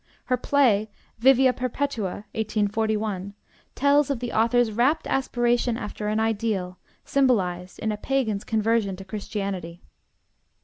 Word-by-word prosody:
Her 255 - +2
play, 240 -5 +2 0.3
'Vivia 260 +1 +5
Perpetua' 250 -6 -3
(1841), 215 -2 -1 0.4
tells 285 +1 +3
of 275 -4 -1
the 245 -1 -4
author's 230 +1 +3
rapt 255 +9 +2
aspiration 240 -2 +1
after 210 -2 -5
an 215 +1 0
ideal, 210 -5 -1 0.3
symbolized 185 -10 +1
in 220 - -2
a 210 - -3
pagan's 220 -4 -1
conversion 220 -2 +1
to 190 +1 -10
Christianity. 195 -4 -5
220 Hz, 120 wpm, -25 LUFS, 200-250 Hz, 0.4 s, Vivia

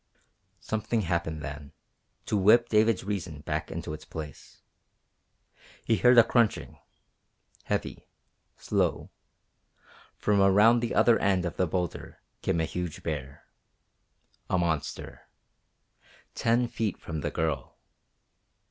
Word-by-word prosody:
Something 110 +1 -1
happened 80 -4 -2
then 70 -1 -8 0.5
to - - -1
whip 110 +4 +5
David's 110 -1 +3
reason 90 -7 -4
back - - -3
into 75 - -5
its 75 0 -8
place. 75 -3 -10 1.2
He 115 - +2
heard 125 0 +5
a 120 - +10
crunching 115 -3 0 0.9
heavy, - - -3 0.5
slow. - - -1 1.1
From 105 -1 +2
around 105 +5 +5
the 120 0 -2
other 120 -2 +5
end 95 -3 +1
of 85 - -4
the 90 - +1
boulder 90 +1 -4 0.2
came 85 - 0
a 80 - +1
huge 90 -1 -5
bear. 70 -3 -5 1.0
A 95 - +2
monster. 80 -4 -3 1.0
Ten 120 +1 +1
feet 110 -4 -2
from 80 -2 -6
the - - -2
girl. 80 -3 -3
90 Hz, 115 wpm, -28 LUFS, 80-110 Hz, 1.2 s, a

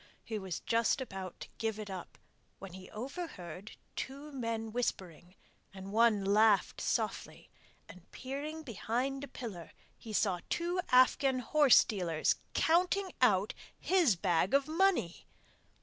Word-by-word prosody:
He 220 -2 -4
was 190 -3 -5
just 230 +3 +1
about 190 -8 -7
to - - -6
give 220 -2 -1
it 215 -1 -6
up 190 -3 -8 0.4
when 195 -2 -10
he 185 0 -10
overheard 215 - -7 0.2
two 280 +3 -6
men 230 -4 -3
whispering, 185 -7 -4 0.4
and 190 +1 -8
one 220 -2 +3
laughed 210 +1 +3
softly, - - -3 0.4
and 180 -1 -15
peering 290 +4 -6
behind 255 +2 -2
a - - -5
pillar, 205 -12 -8 0.3
he 225 - -10
saw 195 -4 +1
two 350 +2 -1
Afghan 255 +1 +4
horsedealers 215 - +3 0.2
counting 365 +3 +2
out 205 -5 +3 0.2
his 345 - +3
bag 180 +4 +1
of 280 0 +2
money! 325 - +1
225 Hz, 130 wpm, -32 LUFS, 190-275 Hz, 0.4 s, Afghan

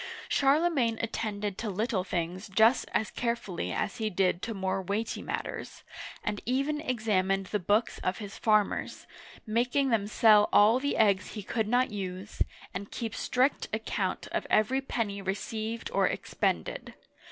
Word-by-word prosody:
'* - - -11
Charlemagne 275 -5 +3
attended 210 -3 -3
to 225 - -2
little 210 0 -1
things 180 +2 -3
just 220 +6 +4
as 215 - 0
carefully 235 -7 -2
as 205 - -2
he 220 -1 -1
did 185 -2 +1
to 225 -1 -4
more 190 0 -1
weighty 205 +4 -2
matters, - - -5 0.4
and 210 -1 -2
even 275 +5 0
examined 200 -8 0
the 210 +2 -2
books 205 +5 +1
of 185 - -1
his 205 -3 -7
farmers, 215 -2 +1 0.4
making 245 +4 +1
them 210 -3 +2
sell 215 -1 +5
all 220 +4 +6
the 285 +2 -1
eggs 200 -4 +3
he 210 - -6
could 220 +1 -1
not 245 +2 +2
use, 190 -1 -6 0.3
and 200 +2 -5
keep 225 -2 -4
strict 255 +4 +1
account 210 -3 -2
of - - -2
every 255 +5 +3
penny 215 -6 -2
received 220 +4 -3
or - - +3
expended. - - -2
215 Hz, 150 wpm, -29 LUFS, 195-235 Hz, 0.4 s, all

